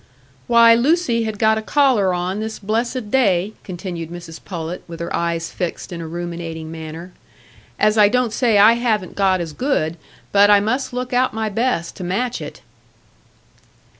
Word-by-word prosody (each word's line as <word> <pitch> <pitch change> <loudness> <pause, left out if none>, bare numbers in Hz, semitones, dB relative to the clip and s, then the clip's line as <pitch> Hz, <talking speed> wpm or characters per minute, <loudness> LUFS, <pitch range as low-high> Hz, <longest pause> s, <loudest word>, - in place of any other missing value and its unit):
"Why, 235 -1 +7
Lucy 240 -2 +2
had 215 -1 -4
got 220 +1 +3
a - - -5
collar 240 -6 +2
on 180 +3 -2
this 220 0 -4
blessed 225 +2 -2
day," 205 -6 +2
continued 175 -3 -6
Mrs 170 -1 -10
Pullet, 170 -1 -6
with 165 -1 -9
her 170 - -3
eyes 170 -1 -2
fixed 180 0 -5
in 170 - -6
a 165 - -6
ruminating 170 -1 -6
manner, 165 +2 -8 0.7
"as 215 +1 +3
I 205 -1 +7
don't 250 -1 0
say 230 -3 +2
I 210 +3 +7
haven't 225 -6 -1
got 190 -2 +2
as 165 -3 -5
good, 170 - -1 0.3
but 205 0 +5
I 205 -1 +7
must 250 +8 -1
look 250 +1 -4
out 250 -1 +1
my 220 -1 -1
best 210 -6 -1
to 185 - -6
match 235 +8 -2
it." - - -9
205 Hz, 170 wpm, -20 LUFS, 175-235 Hz, 0.7 s, Why